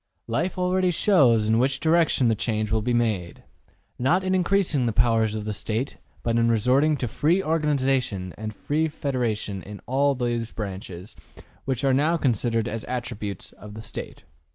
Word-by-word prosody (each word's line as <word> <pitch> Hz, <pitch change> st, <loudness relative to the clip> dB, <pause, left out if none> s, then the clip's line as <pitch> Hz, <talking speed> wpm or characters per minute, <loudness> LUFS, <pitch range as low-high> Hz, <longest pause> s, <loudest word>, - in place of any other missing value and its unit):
Life 160 Hz, +12 st, -2 dB
already 185 Hz, 0 st, +2 dB
shows 135 Hz, -, +4 dB
in 110 Hz, +1 st, +3 dB
which 135 Hz, +1 st, +1 dB
direction 160 Hz, -5 st, +3 dB
the 115 Hz, -, +4 dB
change 110 Hz, 0 st, -1 dB
will 110 Hz, 0 st, +2 dB
be 120 Hz, +3 st, -1 dB
made. 110 Hz, -8 st, -1 dB, 0.6 s
Not 165 Hz, +10 st, +2 dB
in 190 Hz, 0 st, 0 dB
increasing 180 Hz, -8 st, +2 dB
the -, -, +1 dB
powers 110 Hz, -1 st, +2 dB
of 105 Hz, -1 st, -4 dB
the 105 Hz, -, -2 dB
State, 110 Hz, +6 st, -3 dB, 0.3 s
but 115 Hz, 0 st, +1 dB
in 115 Hz, 0 st, +3 dB
resorting 130 Hz, +7 st, +3 dB
to 125 Hz, -, -2 dB
free 165 Hz, -, +1 dB
organization 135 Hz, -, 0 dB
and 110 Hz, 0 st, -5 dB
free 150 Hz, +9 st, -1 dB
federation 120 Hz, -9 st, -2 dB
in 105 Hz, +1 st, -9 dB
all 140 Hz, +3 st, +2 dB
those 120 Hz, -2 st, -2 dB
branches 95 Hz, -2 st, -7 dB, 0.5 s
which 130 Hz, -2 st, -2 dB
are 135 Hz, -1 st, +3 dB
now 155 Hz, +6 st, +2 dB
considered 115 Hz, -5 st, 0 dB
as 110 Hz, 0 st, -4 dB
attributes 115 Hz, -6 st, -5 dB
of 105 Hz, 0 st, -12 dB
the 110 Hz, -, -8 dB
State.'' -, -, -7 dB
120 Hz, 170 wpm, -25 LUFS, 110-145 Hz, 0.6 s, shows